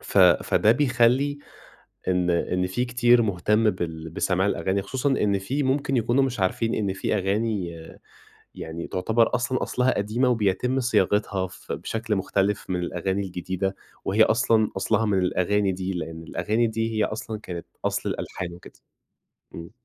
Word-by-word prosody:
ف - - -1
فده 110 - +5
بيخلّي 130 +2 +2 0.7
إن 90 -1 +2
إن 90 +1 0
في 95 +7 -1
كتير 120 -1 +4
مهتم 105 +2 +2
بال 80 -3 -5
بسماع 95 +3 0
الأغاني. 95 0 0
خصوصًا 130 +7 -1
إن 105 -7 +2
في 130 +10 -2
ممكن 135 +1 0
يكونوا 120 +3 +2
مش 125 -5 -3
عارفين 115 +5 0
إن 100 -3 -1
في 95 - -2
أغاني 100 -1 -1 0.8
يعني 80 +1 -6
تعتبر 110 +6 +1
أصلًا 125 +1 0
أصلها 125 +1 +1
قديمة، 110 +6 +1
وبيتم 125 +3 +1
صياغتها 105 -5 +1
ف 95 - -9
بشكل 110 - -2
مختلف 100 +1 -1
من 90 -1 0
الأغاني 95 +3 -2
الجديدة، 95 +1 -3 0.3
وهي - - +3
أصلًا 110 -2 +3
أصلها 110 +3 +1
من 100 -2 +2
الأغاني 95 +2 +1
دي. 95 +1 -3
لإن 80 -2 -5
الأغاني 105 +8 0
دي 115 0 -2
هي 110 - +3
أصلًا 110 0 -4
كانت 85 -5 -7 0.2
أصل - - -1
الألحان 90 -2 -5
وكده. 85 - -15 0.8
إمم. 85 0 -8
105 Hz, 150 wpm, -25 LUFS, 95-120 Hz, 0.8 s, فده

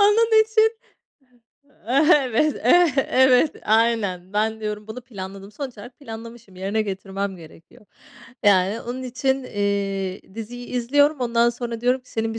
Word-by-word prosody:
Onun 440 +2 +5
için 445 0 +2 1.4
Evet, 265 +4 +1
ev 350 -2 +5 0.2
evet, 260 +3 +4
aynen. 215 -5 +1
Ben 220 +1 0
diyorum 210 0 -5
bunu 220 +3 -7
planladım. 195 -4 -9
Sonuç 260 -3 -7
olarak 245 +7 -12
planlamışım, 230 -5 -10
yerine 200 +4 -1
getirmem 195 -1 -4
gerekiyor. 165 +4 -16 0.6
Yani 200 +2 +3
onun 250 +2 -6
için, 265 +1 -1
eee, 195 -2 -3
diziyi 245 +2 -7
izliyorum. 285 +4 +2
Ondan 235 -1 +2
sonra 235 -1 -6
diyorum 250 +2 +1
ki, 250 - -22
"Senin 225 0 -2
bir - - -4
230 Hz, 135 wpm, -22 LUFS, 200-255 Hz, 1.4 s, Onun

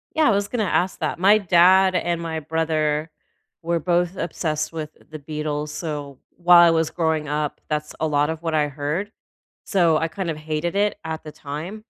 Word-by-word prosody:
Yeah, 315 -1 +4
I - - +5
was 200 0 +1
gonna 240 -3 -1
ask 185 0 0
that, - - -2
my 200 +4 +6
dad 185 0 +5
and 170 -1 0
my 165 -1 -3
brother 155 -1 -1 0.5
were 170 0 0
both 175 +2 0
obsessed 155 -2 -2
with 155 -2 -5 0.2
the 155 0 -8
Beatles, 150 0 -4
so, 145 -4 -6 0.2
while 175 0 +7
I - - +5
was 160 -1 +1
growing 160 -3 -1
up, 150 0 -2
that's 150 0 -3
a 160 - 0
lot 145 0 +1
of 160 0 -6
what 165 -1 -2
I 150 -1 +2
heard. 150 +8 -3 0.5
So, 170 -5 +3
I, 165 - 0
kind 180 +2 -4
of 160 - -3
hated 155 +3 -3
it 205 +1 +1
at 160 0 -5
the 155 - -8
time, 160 +11 -7
160 Hz, 195 wpm, -22 LUFS, 150-175 Hz, 0.5 s, while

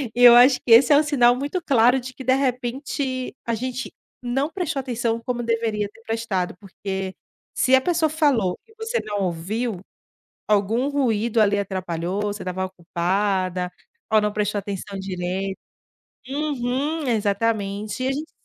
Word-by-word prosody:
e 245 - +3
eu 240 -1 +10
acho 250 +2 +7
que 240 - -3
esse 240 +4 +8
é - - +7
um 300 - +4
sinal 250 -5 +4
muito 285 +8 -3
claro 250 -2 +4
de 255 +1 -8
que, 265 - -9
de 260 +1 +3
repente, 255 0 -2
a 235 - -1
gente 255 +3 -4 0.3
não 270 +4 0
prestou 350 -7 -2
atenção 235 -3 -2
como 245 -1 -2
deveria 225 -3 0
ter 225 - -20
prestado 225 -5 -2
porque, 190 -1 -5 0.4
se 260 - +2
a - - +6
pessoa 330 +1 +1
falou 280 - +1
e 445 - -21
você 450 +2 -2
não 205 -1 -3
ouviu, 190 +5 -2 0.7
algum 215 +5 +2
ruído 235 -5 +1
ali 205 -1 +3
atrapalhou, 185 -1 -3
você 205 0 -3
estava 185 +1 -2
ocupada 185 +1 -1 0.4
ou 215 - +6
não 210 0 0
prestou 210 0 -1
atenção 200 0 -6
direito. 190 +1 -3 0.7
Uhum, 285 +1 -2
exatamente, 210 0 -1
e - - +1
a - - +1
gente 305 +3 -5
230 Hz, 160 wpm, -23 LUFS, 200-260 Hz, 0.7 s, eu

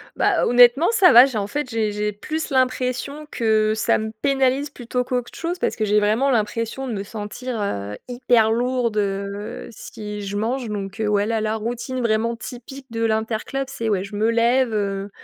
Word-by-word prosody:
Bah, - - +2
honnêtement, 245 +6 +6
ça 370 -9 +6
va, 245 +2 +10
j'ai 255 -5 -3
en 200 -1 -1
fait 290 +3 -3
j'ai 220 -2 0
j'ai 210 0 -1
plus 310 +11 -4
l'impression 260 +2 -1
que 215 -2 +2
ça 215 - +2
me 220 0 -4
pénalise 270 +1 +1
plutôt 250 -2 -3
qu'autre 250 -1 -3
chose, 350 +1 -3
parce - - 0
que 215 - -1
j'ai 210 +1 +3
vraiment 220 +7 +2
l'impression 230 +3 -1
de 235 - -3
me 200 -1 -3
sentir, 215 +3 -5
heu, 105 - -3
hyper 240 -3 +2
lourde, 240 -2 0
heu, 200 0 -3
si 210 -1 -8
je 200 0 -4
mange 235 +2 -2
donc 200 -1 -5
heu, 215 - 0
ouais 205 0 +2
là, 225 -1 -1
la 215 0 -1
routine 240 +3 -4
vraiment 230 +1 +1
typique 260 +3 -9
de 230 0 -2
l'interclub, 225 +5 -1
c'est 230 -4 -3
ouais 195 -2 +1
je 205 +1 -8
me 220 +2 +1
lève, 235 +1 +2
heu, 200 -1 -2
230 Hz, 195 wpm, -22 LUFS, 210-255 Hz, -, va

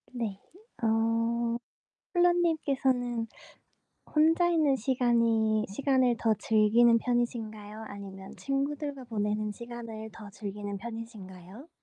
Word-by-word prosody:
네. 220 -6 -3 0.4
어. 230 +1 +1 0.6
폴라님께서는 275 -9 +2 0.9
혼자 325 +3 +5
있는 315 -5 +3
시간이 230 -3 +2
시간을 255 +2 +2
더 225 -1 +3
즐기는 225 +2 +4
편이신가요? 220 -3 -2
아니면 195 -1 -9
친구들과 280 0 -2
보내는 210 -2 -1
시간을 230 -1 -8
더 215 -2 -10
즐기는 205 0 -5
편이신가요? 220 - -9
230 Hz, 250 characters per minute, -29 LUFS, 215-260 Hz, 0.9 s, 혼자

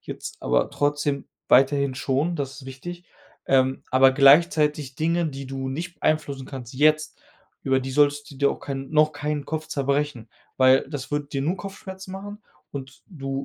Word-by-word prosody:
jetzt - - -8
aber - - +1
trotzdem 145 -1 0 0.2
weiterhin 135 0 +4
schon, 145 +6 0
das 135 0 -5
ist - - -13
wichtig, 175 +7 -8 0.4
ähm, 130 0 +2
aber 130 +1 +6
gleichzeitig 150 0 +4
Dinge, 165 +3 +1
die 135 -2 -6
du 135 0 -4
nicht 170 +6 -5
beeinflussen 145 -4 0
kannst 130 -2 -8
jetzt, 155 +1 +2 0.4
über 135 -1 +2
die 130 +1 -5
solltest 145 +1 +2
du 140 - -12
dir 140 0 +3
auch - - -10
kein 135 0 -5
noch 155 0 +4
keinen 145 0 -3
Kopf 155 0 -4
zerbrechen, 140 -4 -1 0.3
weil 130 +1 +5
das 145 -2 -6
wird 145 -1 -3
dir 135 -1 -1
nur 170 +6 0
Kopfschmerzen 190 -1 -8
machen 205 +2 -8 0.3
und 135 -2 -8
du 135 -6 -5
145 Hz, 170 wpm, -24 LUFS, 135-155 Hz, 0.4 s, aber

